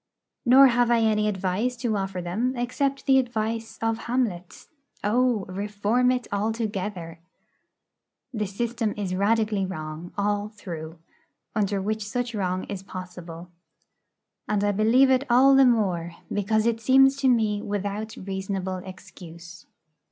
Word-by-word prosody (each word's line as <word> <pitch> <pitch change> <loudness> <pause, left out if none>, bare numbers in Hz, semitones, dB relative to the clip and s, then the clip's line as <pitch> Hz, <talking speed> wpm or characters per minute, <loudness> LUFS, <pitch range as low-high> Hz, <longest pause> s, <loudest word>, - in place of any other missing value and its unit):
Nor 265 +3 +8
have 240 0 +2
I 235 -1 +3
any 215 -1 +2
advice 195 +5 -1
to 230 -3 -1
offer 195 -2 -3
them 225 +9 -1
except 270 +3 -1
the 265 -1 +5
advice 225 -2 -3
of 225 0 0
Hamlet: 220 -8 -2 0.4
'O, 235 -1 +1
reform 205 +6 0
it 250 -2 0
altogether.' 200 -5 -3 1.1
The 215 -3 -2
system 225 +2 -2
is 195 -3 -3
radically 210 +1 +1
wrong, 155 -2 -6
all 205 +1 0
through, 170 -6 -8 0.6
under 200 -2 0
which 215 +2 -2
such 240 +3 -3
wrong 185 -3 -1
is 200 -2 -6
possible. 180 -2 -9 1.0
And 210 -1 0
I 205 - +2
believe 230 +6 +4
it 260 +1 +3
all 260 +3 +6
the 270 0 +6
more 180 -8 0 0.2
because 215 +2 +1
it 230 -1 0
seems 270 +3 +5
to 275 -1 +1
me 220 -4 +2
without 205 +2 -4
reasonable 190 -1 -4
excuse. 170 -3 -12
210 Hz, 135 wpm, -25 LUFS, 190-235 Hz, 1.1 s, Nor